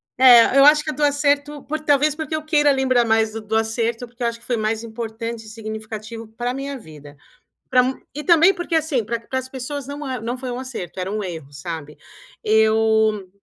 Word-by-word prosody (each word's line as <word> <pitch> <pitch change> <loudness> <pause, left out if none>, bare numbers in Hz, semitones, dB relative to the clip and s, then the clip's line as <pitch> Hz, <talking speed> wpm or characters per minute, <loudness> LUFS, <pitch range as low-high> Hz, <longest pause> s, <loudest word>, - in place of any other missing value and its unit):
É, 250 0 +7
eu 275 - +8
acho 300 0 +6
que 310 - -3
é - - -6
do 295 +2 -3
acerto 285 0 +1
por 310 +1 -4
talvez 295 0 +2
porque 315 0 -4
eu 310 - -4
queira 295 -2 +3
lembrar 255 -3 +2
mais 220 -1 +2
do 225 - -5
do 215 +1 -3
acerto, 230 +2 -1
porque 240 +1 -9
eu - - +2
acho 230 0 -4
que - - -18
foi 240 -2 -1
mais 220 +1 -1
importante 230 0 -6
e - - -11
significativo 220 0 -7
para 240 +3 -4
minha 275 +1 -5
vida. 150 - -13 0.6
Para 255 +1 +3 0.2
e 300 - -6
também, 340 +2 +6
porque 350 -2 -4
assim, 300 -8 +1
pra 230 +1 -3
pra 260 +3 -4
as 260 0 -6
pessoas 265 +1 -6
não 285 +1 -6 0.2
não 240 +2 -3
foi 255 -1 -5
um 245 - -4
acerto, 230 -10 -7
era 185 +2 -3
um 210 0 -2
erro, 160 -6 -7
sabe? 150 0 -7 0.5
Eu 220 -2 +2
235 Hz, 215 wpm, -21 LUFS, 220-280 Hz, 0.6 s, eu